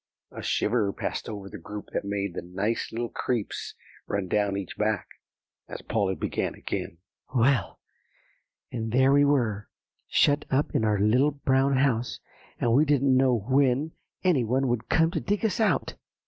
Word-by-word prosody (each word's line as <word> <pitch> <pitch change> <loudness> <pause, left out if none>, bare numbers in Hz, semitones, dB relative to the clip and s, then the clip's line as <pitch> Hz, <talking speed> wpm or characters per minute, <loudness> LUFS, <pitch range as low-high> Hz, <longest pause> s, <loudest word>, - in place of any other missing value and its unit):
A - - -8
shiver 105 -3 +1
passed - - -4
over 100 -3 -6
the - - -9
group 105 +4 -8
that - - -1
made 100 -2 -2
the - - -4
"nice 95 +6 -2
little 120 +1 -3
creeps" 120 -5 -3 0.3
run 100 -2 -2
down 100 +1 +1
each 100 -2 -6
back, 105 -2 -1 0.6
as - - -7
Polly 100 -4 0
began - - -2
again, 85 - -5 0.4
"Well, 130 +1 +2 0.9
and 115 -2 -3
there 130 +3 +4
we 145 0 +5
were, 115 -8 +1 0.4
shut 145 +1 +3
up 140 +3 0
in - - +1
our 105 -1 +2
Little 120 +8 +4
Brown 135 -1 +1
House, 125 -3 +1 0.4
and 115 - +2
we 140 +5 +5
didn't 140 -3 +3
know 125 -5 +2
when 135 +3 +2 0.3
any 170 -9 +3
one 130 +4 +1
would 120 -2 -2
come 165 0 +3
to 170 - -1
dig 205 +5 -1
us 220 +2 0
out." 195 -11 +1
120 Hz, 165 wpm, -27 LUFS, 105-140 Hz, 0.9 s, we